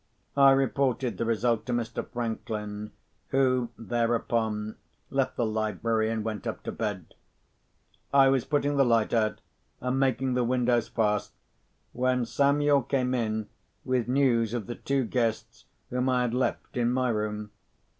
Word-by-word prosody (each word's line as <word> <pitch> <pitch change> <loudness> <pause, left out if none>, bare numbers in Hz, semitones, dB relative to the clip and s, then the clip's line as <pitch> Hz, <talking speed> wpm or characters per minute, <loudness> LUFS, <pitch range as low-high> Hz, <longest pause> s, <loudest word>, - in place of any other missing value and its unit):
I 140 -1 +7
reported 135 -4 0
the 115 - 0
result 115 0 0
to 125 - -1
Mr. 120 -1 -2
Franklin, 105 -3 -4 0.4
who, 130 -3 +2
thereupon, 115 -2 -1 0.3
left - - 0
the 120 - 0
library, 110 +1 0
and 110 -1 -2
went 110 -3 -4
up - - -4
to - - -4
bed. 105 -6 -4 1.0
I 135 -1 +6
was 135 -3 +2
putting 145 0 0
the 135 - +6
lights 115 -3 +2
out, 110 -2 +1 0.4
and 125 +1 -1
making 130 -1 +1
the 125 0 +1
windows 120 -1 +1
fast, 105 -2 0 0.6
when 125 0 +1
Samuel 140 +3 +3
came 130 0 0
in 110 -3 -1 0.4
with 130 -2 0
news 120 -4 +2
of 115 -4 -3
the 120 - -5
two 135 +2 -1
guests 115 -2 -2 0.3
whom 125 +1 0
I 125 -1 +2
had 120 -1 -1
left 125 +1 -1
in 120 0 +2
my 130 0 +1
room. 105 -1 -2
120 Hz, 150 wpm, -28 LUFS, 110-130 Hz, 1.0 s, I